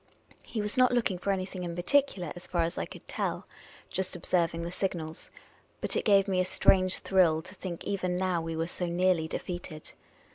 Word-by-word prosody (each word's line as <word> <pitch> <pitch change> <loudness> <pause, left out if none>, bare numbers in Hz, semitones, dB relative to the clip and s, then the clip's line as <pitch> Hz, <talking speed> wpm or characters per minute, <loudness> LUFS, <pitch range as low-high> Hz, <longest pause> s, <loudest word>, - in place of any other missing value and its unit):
He 220 - -4
was 210 +5 -1
not 255 -1 +6
looking 225 -7 +1
for 200 - -3
anything 185 -1 -3
in 170 -1 -4
particular, 180 - +1
as 175 - -9
far 175 -2 +1
as 170 +2 -2
I - - -2
could - - -12
tell - - -2 0.2
— - - -22
^just 190 -1 -1
observing 170 -1 0
the 170 - -4
signals. 170 -4 -4 0.5
But - - 0
it - - 0
gave 200 -1 +5
me 190 -2 +1
a - - +4
strange 185 0 +4
thrill 170 -5 +3
to 185 - -11
think 180 -3 -6
even 185 -3 -1
now 180 -2 0
we 165 0 -4
were 165 +1 0
so 175 +1 -3
nearly 175 -1 +2
defeated. 175 -2 -6
180 Hz, 205 wpm, -29 LUFS, 170-190 Hz, 0.5 s, not